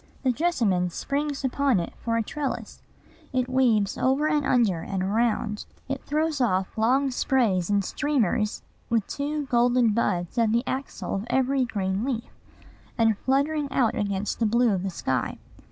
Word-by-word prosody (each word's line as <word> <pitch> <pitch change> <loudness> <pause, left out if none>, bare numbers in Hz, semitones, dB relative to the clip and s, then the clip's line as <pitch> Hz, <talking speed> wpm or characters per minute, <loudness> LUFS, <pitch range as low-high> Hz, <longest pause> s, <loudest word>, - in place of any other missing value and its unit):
The 260 - +3
jessamine 230 - +1
springs 280 - -3
upon 265 -4 +2
it 170 - -4
for 230 -1 -1
a 230 - +1
trellis: 285 +5 -5 0.5
it 255 -1 0
weaves 240 -6 +2
over 270 +4 +2
and 300 -1 +1
under 210 -9 +2
and 190 +1 -3
around; 215 +1 0 0.2
it 270 0 -4
throws 305 -1 0
off 190 -5 0
long 260 +5 +2
sprays 225 -9 +1
and 200 -1 +2
streamers 225 - 0 0.3
with 230 -4 +1
two 290 +1 -3
golden 245 -1 +3
buds 185 -3 0
at 225 -2 +3
the 235 +2 +2
axil 270 +1 -4
of 200 +4 -3
every 265 +1 +2
green 195 -3 -2
leaf, 245 -3 -3 0.6
and 225 -2 +3
fluttering 280 +5 0
out 240 -5 +2
against 200 0 -2
the 225 - +2
blue 235 0 +3
of 185 - -1
the 195 - -2
sky. 130 -8 -2
235 Hz, 160 wpm, -26 LUFS, 205-270 Hz, 0.6 s, The